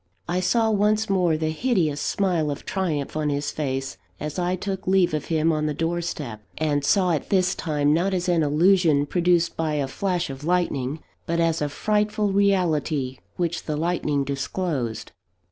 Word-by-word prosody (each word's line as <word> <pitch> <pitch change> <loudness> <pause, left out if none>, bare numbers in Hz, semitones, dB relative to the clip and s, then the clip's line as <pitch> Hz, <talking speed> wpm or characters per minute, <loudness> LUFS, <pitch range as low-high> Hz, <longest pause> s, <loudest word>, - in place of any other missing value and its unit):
I 180 +1 0
saw 225 +4 +2
once 210 0 +2
more 175 -4 +2
the 155 0 -1
hideous 160 - 0
smile 175 -6 0
of 145 - -5
triumph 160 -9 -2
on 155 -1 0
his 145 0 -1
face, 135 -2 -3 0.2
as 150 +4 -4
I 180 +1 0
took 190 0 -5
leave 185 -3 +3
of 150 - -2
him 160 0 +1
on 155 -1 0
the 150 - -2
doorstep: 165 -9 -3 0.2
and 150 -2 0
saw 185 +3 +3
it, 155 - -2
this 185 -1 +2
time, 150 -3 +1
not 175 +5 +1
as 185 -1 -1
an 175 -2 +3
illusion 155 0 +3
produced 175 +1 +2
by 160 -2 -1
a 140 -2 0
flash 180 +1 -2
of 135 +1 -9
lightning, 155 -5 -1 0.2
but 170 0 0
as 165 -1 +1
a 145 - 0
frightful 210 +4 0
reality 160 -9 +1 0.2
which 170 -2 -2
the 155 -2 -2
lightning 155 -3 0
disclosed. 135 - -3
165 Hz, 175 wpm, -24 LUFS, 150-185 Hz, 0.2 s, leave